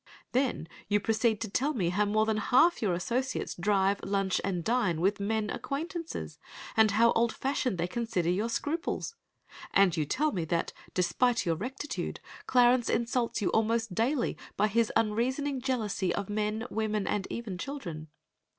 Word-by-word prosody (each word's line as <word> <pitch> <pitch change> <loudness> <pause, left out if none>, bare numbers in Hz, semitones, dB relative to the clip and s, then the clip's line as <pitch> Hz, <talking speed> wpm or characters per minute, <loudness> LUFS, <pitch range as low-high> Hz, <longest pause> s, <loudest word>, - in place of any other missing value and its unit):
Then 255 - 0 0.2
you 205 +1 +3
proceed 220 +1 +1
to 225 - -1
tell 275 +8 0
me 180 -7 +1
how 205 +4 +1
more 215 +1 +2
than 220 -1 0
half 260 +10 +4
your 200 -5 +1
associates 245 +9 -2
drive, 195 +1 +1
lunch, 195 -1 0
and 180 -3 -1
dine 210 -7 +1
with 195 +4 +1
men 215 +1 -1
acquaintances, 330 +4 -5 0.4
and 220 -1 +6
how 230 +3 +4
old 235 0 +2
fashioned 260 -6 -1
they 170 - 0
consider 185 -3 -1
your 210 +6 0
scruples. 325 - -2 0.6
And 195 -4 +4
you 155 - 0
tell 295 - +1
me 175 - -2
that, 170 +1 -1 0.2
despite 215 +7 +2
your 165 -2 +1
rectitude, 260 - -4 0.3
Clarence 245 -1 +4
insults 235 -2 0
you - - +2
almost 225 -1 +1
daily 240 - 0 0.2
by 210 +2 +3
his 230 +1 +2
unreasoning 255 +5 0
jealousy 215 -8 -1
of 200 0 -4
men, 215 +2 -1
women, 215 -2 -1
and 200 -2 -1
even 210 -6 -5
children. 170 - -6
220 Hz, 160 wpm, -30 LUFS, 195-245 Hz, 0.6 s, and